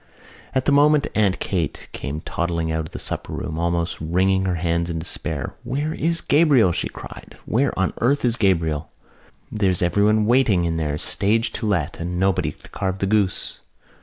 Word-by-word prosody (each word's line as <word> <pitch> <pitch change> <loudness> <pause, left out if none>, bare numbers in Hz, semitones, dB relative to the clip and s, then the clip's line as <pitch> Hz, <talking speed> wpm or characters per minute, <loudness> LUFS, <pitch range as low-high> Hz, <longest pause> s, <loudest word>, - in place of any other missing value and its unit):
At 130 - +1
the - - +3
moment 145 +1 +5
Aunt 100 -3 +2
Kate 85 -6 -2
came 75 +3 -5
toddling 85 -1 -2
out 80 -1 -2
of - - -17
the - - -7
supper - - -3
room, 80 0 -4
almost 85 0 -1
wringing 95 +4 +1
her 90 -1 0
hands 85 0 -1
in 85 - -3
despair. 80 +1 -4
"Where 140 +6 -2
is 165 +1 0
Gabriel?" 145 - +4
she - - -2
cried. - - -11
"Where 135 +6 +1
on 95 0 +1
earth 135 +3 +2
is 120 -2 +3
Gabriel? 80 -8 +1 0.6
There's 95 -4 +1
everyone 105 +4 +3
waiting 110 -7 +3
in 80 -1 -1
there, 75 -2 -1
stage 110 +8 +1
to 110 - -3
let, 85 -6 -1
and 90 +1 -3
nobody 95 -1 +1
to - - -17
carve 95 -1 -2
the 95 - -1
goose!" 100 -2 0
95 Hz, 180 wpm, -22 LUFS, 85-115 Hz, 0.6 s, moment